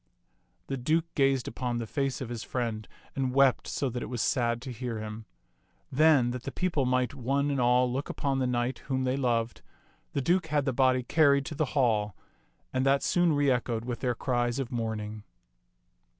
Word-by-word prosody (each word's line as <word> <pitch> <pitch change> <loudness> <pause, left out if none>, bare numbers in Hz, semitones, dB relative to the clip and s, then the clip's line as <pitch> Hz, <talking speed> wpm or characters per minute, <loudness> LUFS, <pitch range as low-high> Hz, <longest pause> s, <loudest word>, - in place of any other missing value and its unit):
The 135 - -3
Duke 155 +6 +1
gazed 135 -2 +2
upon 120 0 -3
the 115 - -3
face 135 +4 -2
of 125 - -4
his 120 -2 -5
friend 115 -4 -3 0.3
and 130 -1 -1
wept 135 -2 +4
so 140 - -1
that 120 +1 -4
it - - -5
was 125 -1 -4
sad 120 -3 +1
to 130 - -6
hear 120 -1 -4
him. 110 +1 -6 0.7
Then, 145 -3 +4
that 125 0 -5
the - - -6
people 165 -8 0
might 125 0 +1
one 140 +2 0
and 135 -2 0
all 125 0 +3
look 135 +3 -3
upon 135 -1 -1
the 130 - +1
knight 125 +1 -1
whom 130 -1 0
they 130 0 0
loved, 120 -4 -1 0.5
the - - 0
Duke 170 +4 +1
had 145 -2 0
the 135 - 0
body 130 0 +3
carried 140 0 +3
to 155 - -5
the 155 - +1
hall, 105 -7 +2 0.6
and 130 0 +1
that 135 +1 +3
soon 175 -2 +3
reechoed 125 -5 +1
with 120 -1 -4
their 125 -2 -1
cries 120 -1 0
of 135 -3 -3
mourning. 110 -3 -3
125 Hz, 195 wpm, -29 LUFS, 120-140 Hz, 0.7 s, wept